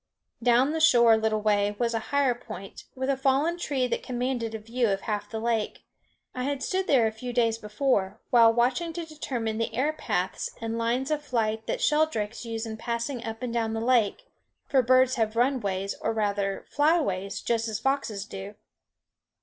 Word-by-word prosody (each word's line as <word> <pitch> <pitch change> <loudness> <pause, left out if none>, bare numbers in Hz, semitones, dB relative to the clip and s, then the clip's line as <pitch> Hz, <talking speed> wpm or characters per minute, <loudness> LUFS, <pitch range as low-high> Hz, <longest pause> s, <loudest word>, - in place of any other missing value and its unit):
Down 245 +4 +4
the 320 - -1
shore 240 -8 +6
a - - +5
little 220 -1 0
way 205 -1 +2
was 235 0 0
a 225 - 0
higher 280 -3 +3
point, 195 -5 -10
with 260 0 -2
a 275 - +2
fallen 275 +6 +1
tree 275 -6 0
that 245 - -2
commanded 245 -3 -2
a - - -2
view 230 +2 -1
of 195 0 0
half 210 -1 -3
the 220 - -4
lake. 225 -1 -1 0.5
I 255 - -4
had 280 +1 -2
stood 380 0 -1
there 255 -5 +4
a 220 - +1
few 245 +3 -6
days 230 -2 +1
before, 210 -2 0
while 230 -2 +7
watching 250 +8 +1
to 340 0 -4
determine 240 -8 -3
the 230 - -1
air 285 +6 +1
paths 185 -11 -2
and 225 0 -3
lines 240 +5 -1
of 300 -1 0
flight 225 -6 -1
that - - -2
sheldrakes 300 - +1
use 225 0 -4
in 220 -1 -6
passing 235 +2 -3
up 225 +2 -6
and 240 -2 -3
down 225 -2 0
the 225 - -2
lake, 240 - +2 0.4
for 270 -3 +3
birds 255 +1 +4
have 220 -1 0
runways, 205 -6 0
or 225 - 0
rather 200 -2 -1
flyways, 205 - +1
just 230 -1 +1
as 220 -2 -2
foxes 225 -6 -1
do. 200 0 -8
235 Hz, 190 wpm, -27 LUFS, 220-265 Hz, 0.5 s, while